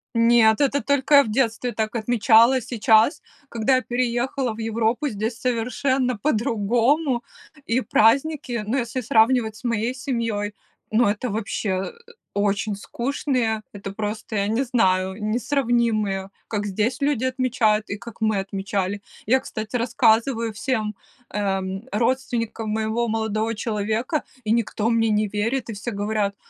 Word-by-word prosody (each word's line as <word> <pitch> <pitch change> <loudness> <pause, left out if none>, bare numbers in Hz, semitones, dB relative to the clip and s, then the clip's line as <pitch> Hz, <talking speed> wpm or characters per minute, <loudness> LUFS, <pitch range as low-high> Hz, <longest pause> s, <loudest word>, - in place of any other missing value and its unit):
Нет, 230 -1 +5
это 285 0 +2
только 285 +1 +2
я 280 - +8
в - - -5
детстве 240 0 0
так 220 +1 -3
отмечала. 230 +2 +4
Сейчас, 225 +2 +3 0.3
когда 235 +3 +2
я 255 - +2
переехала 245 0 -1
в 220 - -11
Европу, 225 +5 0
здесь 225 0 -3
совершенно 250 +1 0
по-другому. 240 +3 +1 0.4
И 230 +3 +1
праздники, 245 +1 +2
но 240 +5 0
если 245 0 -2
сравнивать 225 0 +3
с 225 - -15
моей 235 +1 -1
семьей, 230 -6 -2 0.4
ну 220 +1 +4
это 210 +5 -1
вообще, 215 -1 -3
э, 185 0 -1 0.4
очень 205 +1 0
скучные, 235 0 -2
это 200 -1 -7
просто, 215 +1 -4
я 200 0 +1
не 225 +5 +1
знаю, 190 -7 +1
несравнимые, 230 -4 0 0.2
как 205 -2 -2
здесь 210 +5 -1
люди 280 -4 +1
отмечают 255 -4 +1
и 205 - -3
как 235 0 -11
мы 215 -2 +1
отмечали. 195 0 -3 0.2
Я, 260 +5 +4
кстати, 220 0 -4
рассказываю 230 0 +2
всем, 215 -2 -2 0.4
эм, 195 +1 -2
родственникам 230 -1 -1
моего 220 +2 0
молодого 220 0 -1
человека, 220 +7 -1 0.2
и 215 - -1
никто 225 -1 +1
мне 225 -1 +2
не 210 0 +2
верит, 230 +5 -1
и - - -3
все 220 +4 -5
говорят: 205 -1 -1
225 Hz, 140 wpm, -23 LUFS, 210-245 Hz, 0.4 s, я